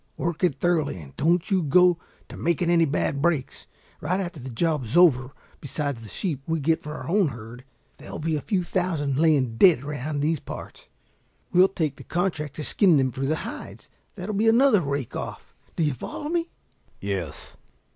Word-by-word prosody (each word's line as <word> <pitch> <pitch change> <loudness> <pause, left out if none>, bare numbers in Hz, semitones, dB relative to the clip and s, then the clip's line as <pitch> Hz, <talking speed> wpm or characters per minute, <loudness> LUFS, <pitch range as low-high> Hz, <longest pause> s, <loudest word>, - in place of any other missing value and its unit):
Work 170 +1 -3
it 160 -7 +2
thoroughly 155 - +1
and 70 -4 -12
don't 170 +6 +1
you 190 -2 +3
go 175 +3 +4 0.3
to - - -10
making 170 +1 0
any 165 -1 +5
bad 140 -1 -1
breaks. 155 -5 -1 0.3
Right 180 +5 -1
after 175 -5 -4
the 130 0 -7
job 150 +3 0
is 120 +8 -2
over, 135 -7 +5 0.3
besides 140 -3 -3
the 110 - -10
sheep 145 - -2
we 165 0 0
get 160 +3 +1
for 150 +1 -7
our - - -7
own 195 0 +3
herd, 120 -1 -9 0.4
there'll - - -8
be 160 +1 -1
a 150 - -2
few 190 0 0
thousand 165 -7 -1
laying 140 -8 +3
dead 165 -7 +6
around 145 0 -3
these 155 +1 +1
parts. - - -9 0.7
We'll 185 +2 +7
take 155 -7 -2
the - - -10
contract 160 -5 -2
to 155 - -5
skin 180 0 +4
them 130 -1 +2
for 135 +2 -3
the 155 - +1
hides. - - -9 0.2
That'll 200 +1 -5
be 215 +3 +1
another 230 -2 +5
rake 140 -4 -3
off. - - -6 0.2
Do 165 - 0
you 150 -2 +1
follow 295 - -6
me?" 335 0 -1 0.5
"Yes." 95 -6 -5
155 Hz, 190 wpm, -25 LUFS, 135-175 Hz, 0.7 s, We'll